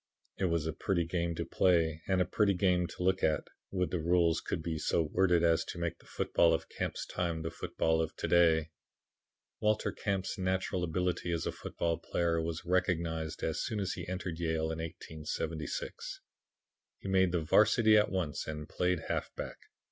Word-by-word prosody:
"It 95 Hz, -, +2 dB
was 85 Hz, -3 st, +1 dB
a 80 Hz, -, -1 dB
pretty 85 Hz, +1 st, 0 dB
game 85 Hz, 0 st, -1 dB
to -, -, -3 dB
play 80 Hz, -3 st, +2 dB
and 95 Hz, -1 st, +3 dB
a -, -, -6 dB
pretty 100 Hz, -1 st, +2 dB
game 90 Hz, -1 st, +2 dB
to 90 Hz, -, -6 dB
look 95 Hz, +1 st, +2 dB
at. 80 Hz, -, +2 dB, 0.3 s
Would 90 Hz, -3 st, -1 dB
that 90 Hz, -, 0 dB
the 80 Hz, -, -4 dB
rules 85 Hz, -1 st, +3 dB
could 80 Hz, -, -3 dB
be 80 Hz, -1 st, -2 dB
so 85 Hz, -, +2 dB
worded 90 Hz, +2 st, +2 dB
as 85 Hz, -1 st, +4 dB
to -, -, -6 dB
make 85 Hz, -1 st, -3 dB
the -, -, -21 dB
football 85 Hz, -1 st, +3 dB
of 80 Hz, -, -5 dB
Camp's -, -, -3 dB
time 85 Hz, -3 st, -2 dB
the 80 Hz, -, -3 dB
football 80 Hz, 0 st, 0 dB
of 80 Hz, -, -3 dB
to -, -, -3 dB
day! 80 Hz, -2 st, +4 dB, 0.9 s
"Walter 105 Hz, 0 st, +1 dB
Camp's 95 Hz, -1 st, -2 dB
natural 95 Hz, -1 st, 0 dB
ability 90 Hz, +1 st, -1 dB
as 85 Hz, -1 st, -1 dB
a -, -, 0 dB
football 85 Hz, -1 st, -2 dB
player 85 Hz, 0 st, 0 dB
was 80 Hz, +1 st, -4 dB
recognized 85 Hz, -3 st, 0 dB
as -, -, -1 dB
soon 110 Hz, -, -2 dB
as 95 Hz, -, -1 dB
he 85 Hz, -, -6 dB
entered 90 Hz, -2 st, -4 dB
Yale 80 Hz, -1 st, 0 dB
in 80 Hz, -, -4 dB
1876. 80 Hz, -1 st, -5 dB, 0.8 s
He -, -, -9 dB
made 95 Hz, -2 st, +3 dB
the 90 Hz, -2 st, +1 dB
'varsity 110 Hz, +7 st, +5 dB
at 105 Hz, 0 st, +5 dB
once 90 Hz, -6 st, -2 dB
and 75 Hz, -1 st, -5 dB
played 90 Hz, -2 st, 0 dB
halfback. -, -, -4 dB
85 Hz, 185 wpm, -32 LUFS, 80-90 Hz, 0.9 s, varsity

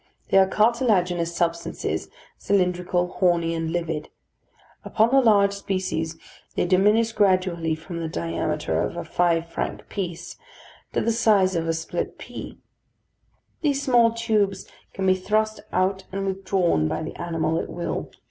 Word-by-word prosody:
They 195 Hz, -, +6 dB
are 190 Hz, -, +5 dB
cartilaginous 190 Hz, -7 st, +2 dB
substances, 170 Hz, 0 st, -2 dB, 0.3 s
cylindrical, 180 Hz, -2 st, +1 dB
horny, 170 Hz, -3 st, +2 dB
and 165 Hz, -1 st, -2 dB
livid. 165 Hz, -3 st, -3 dB, 0.7 s
Upon 225 Hz, +2 st, +2 dB
the 270 Hz, 0 st, +6 dB
large 200 Hz, -4 st, +4 dB
species 185 Hz, -5 st, -3 dB, 0.4 s
they -, -, +1 dB
diminish 210 Hz, +5 st, +3 dB
gradually 185 Hz, -5 st, +2 dB
from 170 Hz, +2 st, -7 dB
the 165 Hz, -, -3 dB
diameter 85 Hz, -, -2 dB
of -, -, -3 dB
a -, -, -3 dB
five 170 Hz, -1 st, +1 dB
franc 165 Hz, -, -4 dB
piece 175 Hz, -3 st, -5 dB, 0.6 s
to -, -, +1 dB
the 230 Hz, -, +1 dB
size 210 Hz, -5 st, +3 dB
of 165 Hz, -1 st, -1 dB
a 165 Hz, -, +1 dB
split 165 Hz, 0 st, -4 dB
pea. -, -, -8 dB, 1.0 s
These 285 Hz, -2 st, +1 dB
small 240 Hz, -3 st, +4 dB
tubes 215 Hz, -4 st, 0 dB, 0.2 s
can 190 Hz, -, -3 dB
be 185 Hz, -, +5 dB
thrust 215 Hz, +3 st, 0 dB
out 190 Hz, +1 st, 0 dB
and 195 Hz, +1 st, -3 dB
withdrawn 190 Hz, -, +1 dB
by 155 Hz, -, -2 dB
the 155 Hz, -, -6 dB
animal 165 Hz, -1 st, 0 dB
at -, -, -5 dB
will. 175 Hz, -, -4 dB
185 Hz, 145 wpm, -24 LUFS, 170-205 Hz, 1.0 s, They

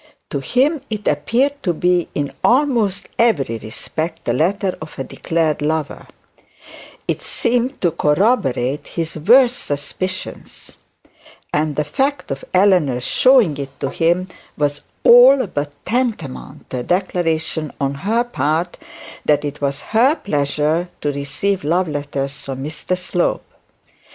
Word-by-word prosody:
To 140 Hz, -, -1 dB
him 270 Hz, -, +1 dB
it 215 Hz, -2 st, -4 dB
appeared 255 Hz, -, +1 dB
to 175 Hz, -4 st, 0 dB
be 180 Hz, +1 st, +2 dB
in 145 Hz, -1 st, -2 dB
almost 235 Hz, -7 st, +2 dB
every 145 Hz, -, +2 dB
respect 160 Hz, +9 st, -5 dB
the 120 Hz, -, +1 dB
letter 185 Hz, -, 0 dB
of 155 Hz, -1 st, -9 dB
a 135 Hz, -, -2 dB
declared 160 Hz, +1 st, -1 dB
lover; 155 Hz, 0 st, -2 dB, 1.0 s
it -, -, -1 dB
seemed 245 Hz, +2 st, 0 dB
to 175 Hz, -, +2 dB
corroborate 150 Hz, -, +1 dB
his 165 Hz, -1 st, -4 dB
worst 245 Hz, -, +5 dB
suspicions; 185 Hz, +6 st, -5 dB, 0.8 s
and 150 Hz, 0 st, 0 dB
the 150 Hz, -, +1 dB
fact 270 Hz, -, -1 dB
of 135 Hz, 0 st, -4 dB
Eleanor's 180 Hz, -10 st, +3 dB
showing 245 Hz, -, +4 dB
it 135 Hz, -1 st, -7 dB
to 135 Hz, -, -2 dB
him 175 Hz, +2 st, +1 dB, 0.3 s
was 145 Hz, -1 st, 0 dB, 0.2 s
all 255 Hz, +2 st, +8 dB
but 145 Hz, -6 st, -4 dB
tantamount 225 Hz, -, -3 dB
to 125 Hz, -, -2 dB
a -, -, -4 dB
declaration 165 Hz, -4 st, -1 dB
on 140 Hz, 0 st, 0 dB
her 210 Hz, +12 st, 0 dB
part, 170 Hz, -7 st, -1 dB, 0.4 s
that 150 Hz, 0 st, +2 dB
it 145 Hz, 0 st, -5 dB
was 140 Hz, 0 st, -1 dB
her 255 Hz, +7 st, +5 dB
pleasure 150 Hz, -, 0 dB
to 145 Hz, -, 0 dB
receive 160 Hz, +8 st, -2 dB
love 175 Hz, +4 st, +1 dB
letters 145 Hz, -2 st, -3 dB
from 135 Hz, -1 st, -5 dB
Mr 165 Hz, +4 st, -3 dB
Slope. 180 Hz, -1 st, -1 dB
165 Hz, 135 wpm, -19 LUFS, 145-215 Hz, 1.0 s, all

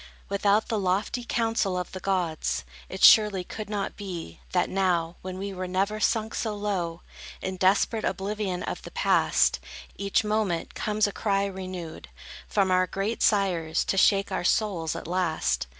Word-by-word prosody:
Without 200 Hz, +2 st, +2 dB
the 225 Hz, -3 st, -1 dB
lofty 200 Hz, +6 st, 0 dB
counsel 225 Hz, -5 st, 0 dB
of 180 Hz, -, -4 dB
the 185 Hz, -, -6 dB
gods, 160 Hz, -, -1 dB, 0.2 s
It -, -, -5 dB
surely 210 Hz, -4 st, +7 dB
could 210 Hz, +3 st, -7 dB
not 205 Hz, -2 st, -3 dB
be, 175 Hz, -, -7 dB
that -, -, +2 dB
now, 175 Hz, -3 st, 0 dB
When 185 Hz, 0 st, -6 dB
we 195 Hz, +1 st, -4 dB
were 185 Hz, 0 st, -4 dB
never 195 Hz, +4 st, 0 dB
sunk 220 Hz, 0 st, +1 dB
so 220 Hz, -2 st, -2 dB
low, 185 Hz, -5 st, -3 dB, 0.4 s
In 190 Hz, -, -4 dB
desperate 195 Hz, +4 st, +2 dB
oblivion 195 Hz, -1 st, -2 dB
of -, -, -4 dB
the -, -, -9 dB
Past, -, -, +2 dB, 0.4 s
Each 200 Hz, +2 st, +1 dB
moment, 210 Hz, -5 st, -1 dB
comes 215 Hz, 0 st, 0 dB
a 205 Hz, -, -1 dB
cry 200 Hz, -1 st, 0 dB
renewed, 185 Hz, -4 st, -6 dB, 0.4 s
From 195 Hz, -3 st, +1 dB
our 185 Hz, 0 st, +3 dB
great 200 Hz, +5 st, -3 dB
sires, 180 Hz, -6 st, +2 dB
to -, -, 0 dB
shake 195 Hz, +1 st, +3 dB
our 190 Hz, -, -1 dB
souls, 175 Hz, -5 st, +1 dB
at -, -, -6 dB
last! 170 Hz, -, 0 dB
195 Hz, 165 wpm, -27 LUFS, 180-210 Hz, 0.4 s, surely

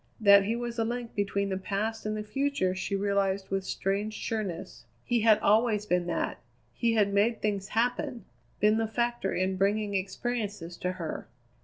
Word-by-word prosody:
That 200 Hz, -2 st, +7 dB
he 225 Hz, +3 st, 0 dB
was 240 Hz, 0 st, -4 dB
a -, -, +3 dB
link 235 Hz, +1 st, -3 dB
between 200 Hz, 0 st, 0 dB
the 190 Hz, -1 st, -2 dB
past 215 Hz, +3 st, -2 dB
and 215 Hz, 0 st, -1 dB
the 210 Hz, -, -3 dB
future 240 Hz, -3 st, 0 dB
she 190 Hz, +1 st, -2 dB
realized 195 Hz, -1 st, 0 dB
with 195 Hz, 0 st, 0 dB
strange 200 Hz, +3 st, -2 dB
sureness. 180 Hz, -, -4 dB, 0.2 s
He 240 Hz, -, +2 dB
had 220 Hz, -1 st, +6 dB
always 215 Hz, 0 st, +3 dB
been 180 Hz, -3 st, +1 dB
that. 175 Hz, -, -2 dB, 0.3 s
He 230 Hz, -1 st, +1 dB
had 205 Hz, -2 st, +3 dB
made 220 Hz, +3 st, +2 dB
things 200 Hz, -2 st, -1 dB
happen; 245 Hz, +3 st, -1 dB, 0.3 s
been 210 Hz, +1 st, +4 dB
the 225 Hz, 0 st, +1 dB
factor 235 Hz, -2 st, -1 dB
in 185 Hz, +1 st, 0 dB
bringing 205 Hz, +1 st, +1 dB
experiences 200 Hz, -2 st, -3 dB
to 180 Hz, 0 st, -2 dB
her. 170 Hz, -10 st, -5 dB
210 Hz, 175 wpm, -29 LUFS, 195-225 Hz, 0.3 s, That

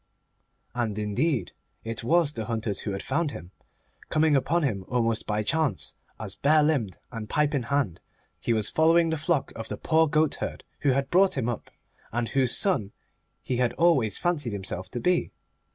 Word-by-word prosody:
And, 115 Hz, -4 st, -2 dB
indeed, 110 Hz, -, 0 dB, 0.3 s
it 115 Hz, 0 st, -3 dB
was 155 Hz, +4 st, +3 dB
the 110 Hz, -5 st, -4 dB
hunters 110 Hz, -3 st, -2 dB
who 105 Hz, -, -3 dB
had 95 Hz, -, -4 dB
found 155 Hz, +3 st, 0 dB
him, 85 Hz, -, -9 dB, 0.6 s
coming 155 Hz, -1 st, +3 dB
upon 165 Hz, +5 st, +1 dB
him 105 Hz, -9 st, -1 dB
almost 115 Hz, -2 st, 0 dB
by 105 Hz, 0 st, 0 dB
chance 140 Hz, -, 0 dB, 0.3 s
as, 105 Hz, -3 st, -5 dB
bare 150 Hz, +5 st, +4 dB
limbed 135 Hz, -, 0 dB
and 115 Hz, -3 st, -6 dB
pipe 150 Hz, 0 st, +1 dB
in 140 Hz, -, +1 dB
hand, 120 Hz, -7 st, -1 dB, 0.4 s
he -, -, -1 dB
was 110 Hz, -3 st, +2 dB
following 165 Hz, +1 st, +4 dB
the -, -, +1 dB
flock 155 Hz, -2 st, 0 dB
of 115 Hz, -, -6 dB
the -, -, -5 dB
poor 160 Hz, 0 st, +3 dB
goatherd 155 Hz, 0 st, 0 dB, 0.2 s
who 145 Hz, -, +1 dB
had 135 Hz, +1 st, -1 dB
brought 190 Hz, -2 st, +4 dB
him 125 Hz, -3 st, 0 dB
up, 120 Hz, -2 st, -4 dB, 0.4 s
and 120 Hz, 0 st, -1 dB
whose 130 Hz, -3 st, +3 dB
son 130 Hz, -, +1 dB, 0.5 s
he 125 Hz, -, -2 dB
had 125 Hz, -1 st, +1 dB
always 135 Hz, -, +3 dB
fancied 150 Hz, -10 st, -1 dB
himself 95 Hz, -2 st, -5 dB
to 120 Hz, -, -4 dB
be. 180 Hz, +6 st, +1 dB
130 Hz, 180 wpm, -26 LUFS, 110-155 Hz, 0.6 s, bare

